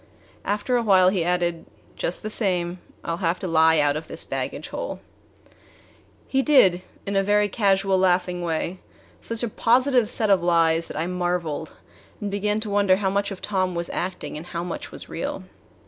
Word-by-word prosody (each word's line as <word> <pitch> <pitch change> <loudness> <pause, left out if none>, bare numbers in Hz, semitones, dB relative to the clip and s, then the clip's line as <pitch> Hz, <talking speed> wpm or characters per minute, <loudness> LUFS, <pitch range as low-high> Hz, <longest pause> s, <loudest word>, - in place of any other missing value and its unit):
After 210 +5 0
a - - +1
while 190 -4 +5
he 185 -3 0
added: 175 -1 -1 0.3
"Just 175 - -2
the 215 - -3
same, 180 -4 0 0.2
I - - -3
'll 165 - -2
have 175 -1 0
to 185 - -5
lie 160 -1 +4
out 145 -1 +3
of 155 +1 -5
this - - -2
baggage - - -4
hole." - - -5 1.3
He 270 - +2
did, 225 - +5 0.2
in 200 - -2
a 195 - +4
very 205 +1 +3
casual, 195 -2 +2
laughing 180 -1 +1
way 170 +2 -2 0.4
such 230 +1 -4
a - - +1
positive 245 +1 +2
set 215 -3 +1
of 190 -3 +4
lies 165 -1 +2
that - - -7
I 160 - -1
marveled 175 -3 -2 0.5
and 205 -1 -4
began 210 +1 0
to 215 - -4
wonder 200 -2 +4
how 190 -1 0
much 200 +1 0
of 195 -2 -8
Tom 185 -3 0
was 170 0 -3
acting 180 0 -4
and 160 +3 -8
how 170 -1 -4
much 175 - -6
was - - -8
real. - - -4
185 Hz, 190 wpm, -24 LUFS, 170-205 Hz, 1.3 s, while